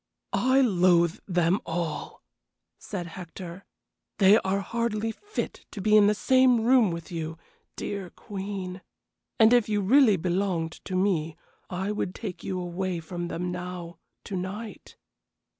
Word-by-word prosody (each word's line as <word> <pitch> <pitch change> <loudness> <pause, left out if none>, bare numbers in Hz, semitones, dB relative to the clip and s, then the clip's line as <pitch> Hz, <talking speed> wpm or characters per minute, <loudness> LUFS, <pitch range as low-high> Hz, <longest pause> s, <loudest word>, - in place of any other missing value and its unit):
"I 260 +7 +4
loathe 180 -5 +3
them 180 +1 +2
all!" 165 -1 -4 0.6
said 185 -4 -5
Hector. 175 +1 -9 0.5
"They 200 +3 +7
are 195 +1 -1
hardly 225 0 -1
fit 415 - -6
to 210 - -8
be 210 +2 +3
in 210 -1 +7
the 210 - +3
same 255 +1 +4
room 240 -2 +5
with 170 0 -6
you, 165 -1 -4 0.4
dear 200 -3 -4
queen 195 -2 -6 0.6
and 220 +2 +7
if 240 -3 +4
you 210 -1 +1
really 220 +1 +5
belonged 175 -1 -1
to 185 - -4
me 175 -5 +1 0.3
I 190 +3 -2
would 200 -3 -3
take 205 -6 -6
you 185 -1 -3
away 180 0 -3
from 175 +1 -5
them 180 +1 -3
now 180 -1 -6 0.2
to 200 - -5
night." 195 +4 -6
190 Hz, 140 wpm, -27 LUFS, 175-210 Hz, 0.6 s, They